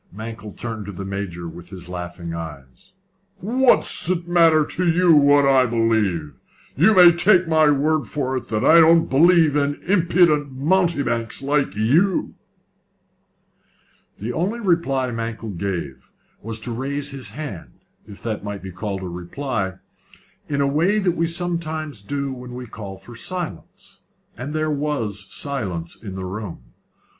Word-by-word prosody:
Mankell 110 0 -8
turned 110 -3 -5
to - - -5
the 95 +1 -7
Major 95 -3 -5
with 85 +1 -11
his 90 -3 -9
laughing 85 -1 -6
eyes. 75 - -9 0.4
"What's 240 -3 +2
it 175 -2 -1
matter 165 -3 +4
to 180 +3 -1
you 170 0 +4
what 145 -1 +5
I 135 -2 +4
believe? 110 -10 0 0.4
You 210 +9 +4
may 180 -2 +9
take 180 +1 +3
my 155 -2 +4
word 150 +1 +1
for 130 -3 -2
it 130 - -4
that 110 +1 -1
I 165 +1 +7
don't 165 0 +5
believe 160 +1 +5
in 145 0 +1
impudent 170 -6 +3
mountebanks 140 -6 0
like 140 -7 0
you." 155 - +2 1.8
The 115 +4 -4
only 195 - -1
reply 165 - 0
Mankell 115 -1 -5
gave 85 -8 -5 0.3
was 110 +1 -5
to 120 - -4
raise 140 +4 -2
his 130 -6 -6
hand 145 - -7 0.3
if 100 -2 -12
that 110 -3 -3
might 100 -2 -6
be 95 - -7
called 95 +1 -5
a - - -4
reply 95 +4 -4 0.7
in 140 -1 -1
the 140 - +2
way 165 +9 +2
we 170 -3 +1
sometimes 160 - -3
do 140 +5 -3
when 125 -1 -9
we 125 0 -6
call 100 -4 -8
for 95 +5 -13
silence, 175 - -6 0.4
and 130 +5 -6
there 155 0 0
was 115 -10 -3
silence 95 - -3
in 100 -3 -7
the 95 -1 -5
room. 95 - -7
130 Hz, 150 wpm, -22 LUFS, 100-160 Hz, 1.8 s, may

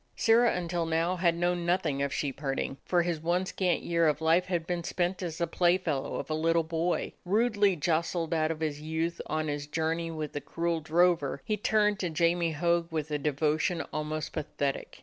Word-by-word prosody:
Sirrah 230 +1 +4
until 175 -1 -2
now 165 +3 +1
had 170 -1 +2
known 175 0 0
nothing 170 -5 0
of 140 0 0
sheep 140 -1 -3
herding, 135 -1 -2
for 175 -1 +2
his 170 -2 -1
one 175 +3 0
scant 185 -2 0
year 170 -1 +2
of 150 -1 +1
life 165 +3 +3
had 175 -3 -2
been 175 0 -2
spent 180 +2 -1
as 165 -3 -4
the 170 - +1
playfellow 170 -4 +1
of - - -4
a 155 - -2
little 165 +1 +2
boy. 165 +2 -1
Rudely 205 0 +2
jostled 165 +1 0
out 155 -1 +1
of 160 -1 -4
his 150 -2 -2
youth 160 +2 -2
on 155 +1 -1
his 145 0 -3
journey 165 +2 -1
with 155 -2 -5
the 145 - -3
cruel 170 +1 -1
drover, 160 -4 +2
he 215 - 0
turned 210 -1 +2
to 180 - -1
Jamie 170 +1 +1
Hogg 170 +2 +1
with 155 -1 -3
a 150 - 0
devotion 155 +4 0
almost 155 0 -3
pathetic. 145 -3 -3
165 Hz, 195 wpm, -29 LUFS, 155-175 Hz, -, Sirrah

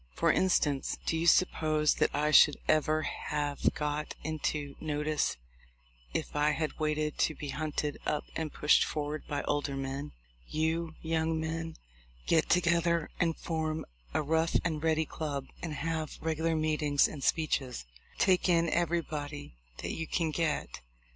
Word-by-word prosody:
For - - +3
instance, 150 -7 +1
do - - +1
you 165 +1 0
suppose 155 -3 +4
that - - +3
I 150 +1 +1
should 150 -1 +7
ever 155 0 +3
have 145 -2 -1
got 150 0 -2
into 150 -2 -2
notice 150 -1 -1 0.7
if - - -3
I 150 +1 +3
had 155 -1 -3
waited 155 0 -1
to 155 - +2
be 145 - -6
hunted 150 0 -2
up 150 - -1
and 160 -2 -2
pushed 150 - +4
forward 150 0 -3
by 145 -1 -2
older 145 -1 -1
men? 135 +2 -4 0.3
You 160 +1 -1
young 160 0 0
men 165 0 -3 0.5
get 160 -1 +3
together 170 -2 +2
and 165 -2 +1
form 160 -1 -2 0.3
a - - 0
Rough 160 +2 +1
and 155 -3 -1
Ready 160 -1 +2
club, 145 -4 -4 0.2
and 160 -3 -4
have 160 0 -3
regular 160 0 0
meetings 150 -2 +2
and 140 -3 -8
speeches. 135 - 0 0.3
Take 185 -1 +3
in 170 -1 +3
everybody 155 - -2 0.3
that - - -2
you 160 -1 -4
can 165 -3 0
get 155 -1 -1
155 Hz, 145 wpm, -31 LUFS, 150-160 Hz, 0.7 s, should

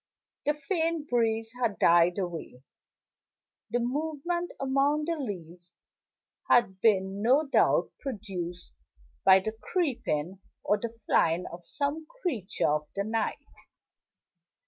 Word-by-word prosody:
The 295 - +3
faint 320 0 -1
breeze 225 -2 +1
had 220 -5 +1
died 175 +1 +5
away; 170 -9 -5 1.1
the 240 - +1
movement 315 +7 -2
among 275 +3 +1
the 335 +1 0
leaves 175 - -7 0.8
had 190 -6 +3
been 195 -2 +2
no 265 +8 +4
doubt 275 - +3
produced 190 - -5 0.5
by 190 0 +7
the 220 - -2
creeping 220 - -2 0.2
or 205 - +2
the 235 - -3 0.2
flying 165 +2 +2
of 170 0 -10
some 300 +2 -2 0.2
creature 225 - -1
of 150 0 -2
the 200 - 0
night. 225 +6 -2
225 Hz, 115 wpm, -29 LUFS, 185-285 Hz, 1.1 s, by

